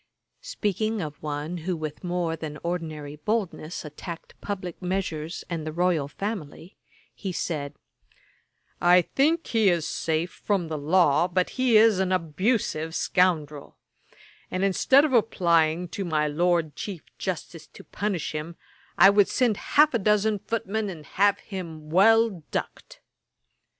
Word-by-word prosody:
Speaking 220 - -2
of 150 -5 -6
one 150 +3 -4
who 175 +2 -3
with 155 +1 -6
more 175 -2 -1
than 155 -2 -6
ordinary 155 -4 -4
boldness 180 -3 -3
attacked 165 +3 -8
publick 185 -4 -5
measures 180 -3 -3
and 165 -3 -4
the 155 - -4
royal 170 -3 +1
family, 180 0 -6 0.4
he 195 - -5
said, 150 -5 -3 1.1
'I 175 +1 +6
think 320 - +1
he 220 -4 +3
is 170 -4 0
safe 165 +2 -1
from 190 -6 -2
the 155 - -3
law, 160 +1 +3
but 180 0 0
he 255 -4 +3
is 215 -3 +5
an 190 -1 0
abusive 165 -1 0
scoundrel; 155 -6 0 0.7
and 185 +1 -2
instead 260 +9 +4
of 290 - -2
applying 170 -7 +2
to 195 - -4
my 155 -4 0
Lord 165 0 +1
Chief 190 -6 -6 0.2
Justice 165 -3 -5
to - - -14
punish 195 -6 -3
him, 155 +2 -5 0.4
I 195 - +8
would 200 -1 +4
send 240 -5 +1 0.2
half 300 0 +7
a 235 - +2
dozen 210 +1 +2
footmen 220 0 -2
and 160 -5 -9
have 200 +5 +2
him 165 -6 -8
well 220 +1 +4
ducked.' - - -5
180 Hz, 140 wpm, -26 LUFS, 155-205 Hz, 1.1 s, I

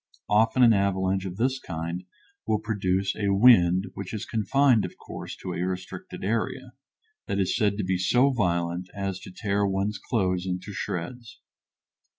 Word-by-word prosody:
Often 110 +4 +4
an 115 -2 +7
avalanche 95 -1 +1
of 95 -1 -6
this 130 +3 +1
kind 85 0 -5 0.4
will 110 - +2
produce 100 -3 -1
a 100 -2 -1
wind, 95 -4 +6
which 100 +2 -6
is 105 - -4
confined, 115 +2 +3
of - - -6
course, - - -8
to 90 - -5
a - - -3
restricted 95 0 -5
area, 110 +3 -2 0.5
that 100 - -1
is 95 -2 +1
said 100 -2 +1
to 105 - -1
be 90 0 0
so 125 +9 +3
violent 90 -5 -1
as 95 -1 -3
to 95 - -11
tear 100 +1 -1
one's 100 +1 -1
clothes 95 -5 -1
into 90 +3 -4
shreds. 115 +6 -5
100 Hz, 160 wpm, -26 LUFS, 90-110 Hz, 0.5 s, an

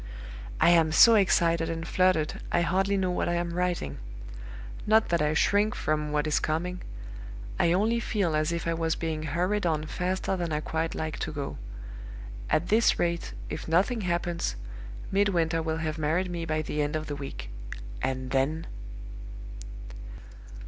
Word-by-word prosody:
"I - - +6
am 165 -2 +4
so 230 +8 +8
excited 170 -5 +3
and 165 0 -4
fluttered, 185 -4 +1
I 175 - +3
hardly 195 +3 +1
know 185 -1 0
what 180 - -1
I 175 - +1
am 170 0 -2
writing. 175 - -2 0.9
Not 220 +1 +4
that 170 -2 +2
I 150 +1 +1
shrink 205 +5 +2
from 150 -1 -1
what 150 0 +1
is 155 - +2
coming 175 +4 -2 0.8
I 170 - +4
only 215 +6 +2
feel 195 -8 0
as 155 +2 +1
if 170 -1 -3
I 165 - +1
was 165 -1 0
being 160 -2 -3
hurried 180 +7 0
on 155 -2 0
faster 185 +4 -2
than 175 -3 -3
I 150 - 0
quite 160 +1 -2
like 155 -2 -4
to 155 - -3
go. 145 - -5 0.9
At 165 +3 +1
this 225 +2 +4
rate, 170 - -1
if - - -6
nothing 195 +9 +2
happens, 175 -1 -1 0.6
Midwinter 175 -5 +2
will 160 0 -2
have 160 -1 -3
married 165 +5 0
me 170 -1 -3
by 155 -1 -1
the 150 0 -2
end 145 +1 -1
of 155 0 -2
the 145 - -4
week. 140 -1 -7 0.5
And 130 -1 -2
then 140 +5 0
165 Hz, 165 wpm, -28 LUFS, 155-180 Hz, 0.9 s, so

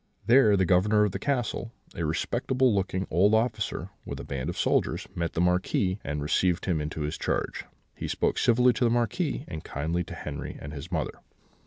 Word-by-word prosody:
There 115 -3 +6
the 95 - +3
Governor 105 +4 +4
of 105 - +1
the 95 - -4
castle, 120 -3 -1 0.2
a 85 - -4
respectable 120 - +1
looking 95 -1 -1
old 100 +6 +4
officer, 110 -2 -1
with - - -6
a - - -5
band 65 -2 -4
of - - -5
soldiers, - - +1
met 85 -1 -2
the 85 - 0
Marquis, 90 +2 +1
and 75 +1 -3
received 85 +3 +1
him 85 -5 0
into 75 +1 -4
his 75 +1 -3
charge. - - -2 0.3
He - - -5
spoke - - 0
civilly 125 +1 +4
to 120 - -1
the 120 - +4
Marquis, 130 +6 0
and 80 -3 -6
kindly 80 +5 -2
to - - -8
Henri - - -6
and 70 +1 -8
his 75 +4 -8
mother. 80 -4 -2
95 Hz, 195 wpm, -27 LUFS, 85-115 Hz, 0.3 s, There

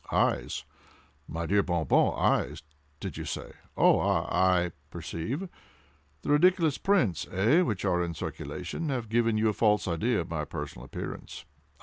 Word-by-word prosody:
"Eyes! - - +1 0.6
my 85 +1 -3
dear 100 +4 +3
Bon 85 -4 -1
Bon—eyes! - - +2 0.4
did - - -5
you - - -4
say?—oh!—ah!—I 90 -2 +1 0.2
perceive! 130 - -4 0.8
The - - -1
ridiculous 165 -1 +4
prints, 170 - +2
eh, 110 - +4
which 105 - -1
are 90 -2 +2
in, 85 -1 -4
circulation, 155 - -5
have 125 -5 -2
given 115 -1 +2
you 110 0 +3
a - - 0
false 105 -1 +2
idea 105 +7 +1
of 85 - -7
my 80 -2 -1
personal 75 -5 -6
appearance? 65 - -7
105 Hz, 135 wpm, -29 LUFS, 85-125 Hz, 0.8 s, ridiculous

